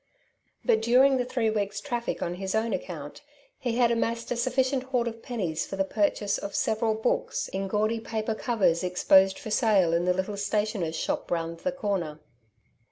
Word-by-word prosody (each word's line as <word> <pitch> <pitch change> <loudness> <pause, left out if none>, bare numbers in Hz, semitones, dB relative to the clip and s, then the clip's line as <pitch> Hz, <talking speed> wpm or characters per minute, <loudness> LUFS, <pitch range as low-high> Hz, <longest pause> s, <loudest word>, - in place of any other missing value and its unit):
But 220 - +3
during 260 +4 +5
the 250 - 0
three 235 -3 0
weeks' 205 -1 -2
traffic 235 +3 -3
on 175 - -2
his 190 +1 -2
own 220 0 0
account 170 -6 -6 0.4
he 240 -2 -2
had 240 -1 +4
amassed 230 0 -1
a - - +1
sufficient 255 +2 +1
hoard 250 -3 0
of 230 0 -6
pennies 180 -11 -3
for - - -5
the 195 - +1
purchase 205 +1 0
of 200 - -6
several 220 0 +1
books 220 - -1
in 195 +1 -3
gaudy 215 +3 0
paper 220 0 -2
covers 205 -7 +1
exposed 190 +1 +4
for 245 -7 -7
sale 205 -7 +3
in 170 +1 +2
the 180 - +3
little 190 +2 -2
stationer's 205 -5 -1
shop - - -2
round 165 -1 -2
the 275 - -1
corner. 195 - -2
215 Hz, 180 wpm, -27 LUFS, 190-235 Hz, 0.4 s, during